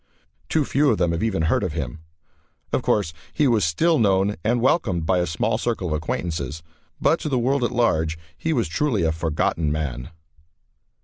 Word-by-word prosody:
Too 155 -3 +2
few 140 +2 +2
of 110 - +2
them 85 -2 +1
have 85 - -2
even 100 -7 0
heard 80 - +2
of 90 -6 -2
him. 75 -2 -4 0.7
Of - - +2
course, 95 -6 +1 0.2
he 150 - +2
was 115 -5 +3
still 155 - +2
known 100 -1 +2
and 120 +3 +2
welcomed 105 - +1
by 90 +1 +2
a 90 - 0
small 110 +7 0
circle 110 -7 -2
of - - -1
acquaintances, 80 -1 -3 0.4
but 165 - +3
to 155 - -3
the 130 - +1
world 130 +2 +1
at 120 - +2
large 80 -10 +1 0.2
he 160 - -2
was 120 - +1
truly 110 - 0
a 80 - +2
"forgotten 80 -1 -1
man." 70 -4 -3
95 Hz, 190 wpm, -23 LUFS, 80-120 Hz, 0.7 s, was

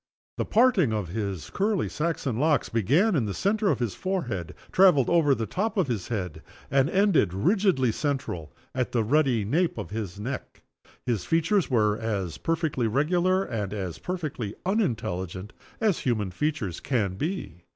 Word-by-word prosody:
The - - +1
parting 220 - +4
of 105 -5 -2
his 100 -3 -4
curly 205 -1 0
Saxon 150 -7 -2
locks 150 0 +2
began 145 - +3
in 130 -7 +1
the 100 - -3
center 205 +1 +1
of - - +2
his 120 -6 -2
forehead, 120 - -3 0.2
traveled 180 -9 +5
over 155 -5 +4
the 115 - -2
top 215 - -2
of 190 - +3
his 115 -8 -3
head, 90 -8 -4 0.3
and 140 +1 +3
ended, 190 - +3
rigidly 170 - +2
central, 135 - -3 0.2
at 125 -2 -2
the 115 -2 +2
ruddy 125 -3 +2
nape 165 - +1
of 105 -2 -6
his 105 -3 -4
neck. 130 +5 -6 0.4
His 115 -7 0
features 165 +4 +1
were 105 -4 +2
as 100 -7 -3
perfectly 160 -7 0
regular 175 - +2
and 105 - -3
as 95 -5 -4
perfectly 150 - -4
unintelligent 105 - -2 0.3
as 215 -6 +2
human 105 -7 -1
features 120 - -2
can 110 -8 0
be. 105 - -4
130 Hz, 160 wpm, -26 LUFS, 105-175 Hz, 0.4 s, traveled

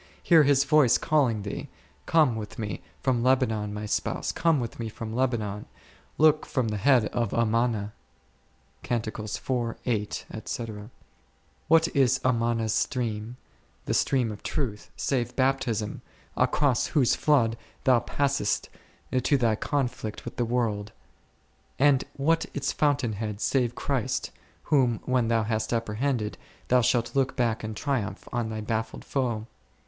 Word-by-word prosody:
Hear 165 -2 +6
His 140 -1 +4
voice 140 -3 +5
calling 135 -10 +1
thee, 100 - -5 0.4
Come 155 -8 +4
with 105 -1 -6
Me 105 -2 -4 0.2
from 130 -3 +1
Lebanon, 115 -5 +2
My 105 +1 -5
spouse, 105 - -1
come 165 -3 +2
with 120 -1 -5
Me 115 -1 -3
from 110 0 -7
Lebanon; 115 -5 -1 0.5
look 155 0 +5
from 130 -7 0
the 105 - -2
head 125 0 +4
of 120 -4 -1
Amana 115 -2 +1 0.9
c. 120 - 0 2.7
What 165 +1 +5
is 135 -4 +4
Amana's 115 -3 +1
stream, 115 -2 -2 0.5
the - - -1
stream 125 -5 +2
of 105 - -8
Truth, 120 -10 -3
save 120 -3 -1
Baptism, 130 -5 0 0.3
across 140 -5 +2
whose 135 -6 +3
flood 125 -7 +3 0.3
thou 125 -2 +5
passest 140 -6 -1 0.5
to 140 +3 +3
thy 115 -4 +2
conflict 125 -4 -3
with - - -7
the 120 - +1
world; 110 -3 -1 0.9
and 140 -1 +4
what 165 +4 +2
its 140 -1 -1
fountain 145 -6 +1
head 105 0 -4
save 120 +1 +1
Christ, 135 -6 -2 0.3
whom 130 -7 +2
when 125 -2 +1
thou 115 -1 +2
hast 110 0 -1
apprehended, 115 0 -1 0.3
thou 125 0 +5
shalt 120 +1 +1
look 135 -1 +1
back 115 -3 0
in 110 0 -4
triumph 130 -5 -2
on 120 -2 -1
thy 110 0 -4
baffled 110 +1 -3
foe 120 -5 -1
120 Hz, 135 wpm, -27 LUFS, 110-135 Hz, 2.7 s, Hear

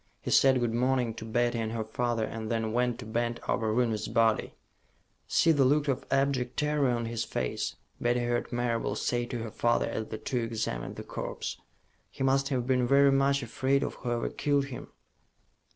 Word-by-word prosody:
He - - -5
said 135 -1 +5
good 120 -2 0
morning 125 -1 +1
to 110 - -8
Betty 120 +1 0
and 110 0 -2
her 115 -1 -2
father, 115 +1 -1
and 110 0 -5
then 115 -2 -1
went 125 0 +1
to 125 - -8
bend 120 +2 -1
over 110 -2 0
Rooney's 110 -2 0
body. 115 0 +1 0.7
"See 165 - +4
the 145 -3 +4
look 145 +3 +3
of 135 -1 -1
abject 135 -3 0
terror 150 -2 +2
on 120 -1 0
his 115 0 -2
face," 60 - -3 0.3
Betty 120 +1 +2
heard 120 0 -1
Marable 120 -1 -1
say 120 0 -1
to 120 - -4
her 115 - -6
father 120 +2 +1
as 110 - -3
the 110 - -5
two 125 +3 -2
examined 115 - -3
the - - -7
corpse. - - -5 0.5
"He - - -5
must 135 +1 +2
have 125 -4 -1
been 125 -1 +2
very 140 +1 +5
much 135 0 +2
afraid 130 +4 +1
of - - -3
whoever 120 -1 -2
killed 145 -1 +1
him." 125 - -7
120 Hz, 190 wpm, -29 LUFS, 115-135 Hz, 0.7 s, said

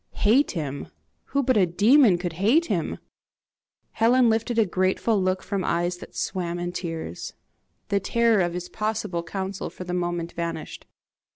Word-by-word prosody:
"Hate 250 +8 +5
him! 145 -5 -4 0.4
Who 280 0 0
but 255 -2 +2
a 190 -3 +4
demon 210 - +5
could 175 -1 -4
hate 275 +12 +4
him?" - - -2 0.9
Helen 235 +1 +4
lifted 225 +2 -1
a 225 - +5
grateful 190 +3 +1
look 185 0 0
from 200 -2 -2
eyes 175 +1 0
that - - -12
swam 175 -2 -2
in 175 0 -3
tears. 165 - -5 0.6
The 200 -1 +2
terror 230 0 +2
of 175 -1 -1
his 180 0 -4
possible 210 -5 -2
counsel 190 +3 -4
for - - -9
the 180 0 -5
moment 175 -1 -2
vanished. 170 -1 -5
185 Hz, 160 wpm, -25 LUFS, 175-220 Hz, 0.9 s, Hate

